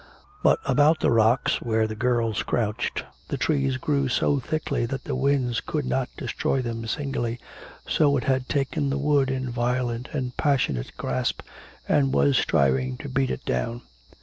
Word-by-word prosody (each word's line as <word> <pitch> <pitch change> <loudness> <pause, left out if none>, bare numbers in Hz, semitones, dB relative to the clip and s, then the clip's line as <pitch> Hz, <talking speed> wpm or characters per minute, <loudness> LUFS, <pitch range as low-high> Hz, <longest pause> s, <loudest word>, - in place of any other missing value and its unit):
But - - +4
about 155 +2 +4
the - - +2
rocks, 115 +2 +3
where 110 -1 +1
the 110 - -4
girls 115 -2 0
crouched 115 0 -1 0.2
the - - -3
trees 135 -4 +1
grew 140 0 0
so 140 +2 +2
thickly 150 -2 -2
that 135 +2 -4
the - - -4
wind 130 -3 +1
could 150 -3 -1
not 130 0 -1
destroy 135 - -1
them 115 -2 -4
singly; 120 -3 -2 0.5
so 145 -2 +3
it 125 - -2
had 130 -1 0
taken 140 +1 0
the 140 - 0
wood 140 -1 +2
in 130 -1 -2
violent 120 +1 -1
and 125 -4 -3
passionate 130 - 0
grasp, 65 -1 -1 0.5
and 135 -2 +2
was 140 -2 +4
striving 65 - +2
to - - -7
beat 130 0 0
it 65 - -4
down. 115 - -2
130 Hz, 165 wpm, -25 LUFS, 115-140 Hz, 0.5 s, But